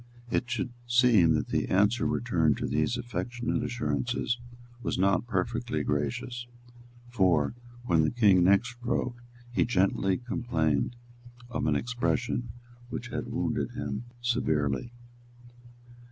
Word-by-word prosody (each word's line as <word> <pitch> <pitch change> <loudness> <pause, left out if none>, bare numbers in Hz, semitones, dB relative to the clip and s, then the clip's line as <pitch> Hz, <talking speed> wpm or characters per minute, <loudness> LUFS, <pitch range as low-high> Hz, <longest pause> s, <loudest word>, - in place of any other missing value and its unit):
It 120 - 0
should 120 0 -2
seem 120 -9 +5
that 75 - -1
the - - 0
answer 105 +5 +3
returned 85 -11 +1
to - - -2
these 75 +11 0
affectionate 120 0 -2
assurances 115 - -1 0.4
was - - -2
not 100 +4 +2
perfectly 115 -9 -1
gracious; 75 - -2 0.6
for, 95 - +2 0.3
when 85 -7 +4
the 80 - +2
King 100 -7 +5
next 100 +7 +3
wrote, 120 0 -1 0.3
he 120 - +2
gently 95 -3 +2
complained 120 - 0 0.6
of - - -1
an - - +2
expression 120 -1 -1 0.4
which - - -5
had - - -4
wounded - - -1
him 110 +3 -4 0.2
severely. 80 - 0
115 Hz, 120 wpm, -29 LUFS, 85-120 Hz, 0.6 s, seem